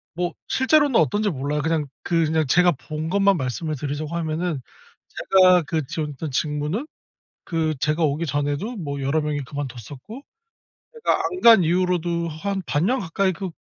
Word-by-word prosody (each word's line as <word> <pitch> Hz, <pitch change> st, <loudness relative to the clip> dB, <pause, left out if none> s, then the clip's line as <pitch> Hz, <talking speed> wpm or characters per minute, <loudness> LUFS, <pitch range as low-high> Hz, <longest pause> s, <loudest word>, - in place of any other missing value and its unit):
뭐 175 Hz, 0 st, -2 dB
실제로는 285 Hz, -1 st, +3 dB
어떤지 205 Hz, +8 st, +1 dB
몰라요. 145 Hz, -1 st, -2 dB
그냥 160 Hz, -2 st, 0 dB
그 165 Hz, -1 st, +1 dB
그냥 155 Hz, 0 st, +1 dB
제가 175 Hz, +5 st, +4 dB
본 155 Hz, +4 st, -5 dB
것만 200 Hz, 0 st, +3 dB
말씀을 150 Hz, +3 st, -3 dB
드리자고 145 Hz, +3 st, -4 dB
하면은 160 Hz, -2 st, -2 dB, 0.5 s
제가 185 Hz, -2 st, +4 dB
그 155 Hz, -1 st, -2 dB
지원했던 150 Hz, -1 st, -4 dB
직무는 150 Hz, -, -2 dB, 0.6 s
그 160 Hz, -2 st, 0 dB
제가 155 Hz, +3 st, 0 dB
오기 155 Hz, +2 st, 0 dB
전에도 145 Hz, -, -2 dB
뭐 140 Hz, -8 st, -5 dB
여러 140 Hz, +4 st, +1 dB
명이 150 Hz, -2 st, -2 dB
그만뒀었고 140 Hz, -, -7 dB, 0.7 s
제가 460 Hz, -, +1 dB
안 365 Hz, -1 st, -2 dB
간 225 Hz, -5 st, +8 dB
이후로도 175 Hz, 0 st, 0 dB
한 190 Hz, +5 st, -3 dB
반년 185 Hz, -, +1 dB
가까이 190 Hz, +2 st, 0 dB
그 190 Hz, +1 st, -5 dB
160 Hz, 325 characters per minute, -23 LUFS, 145-185 Hz, 0.7 s, 간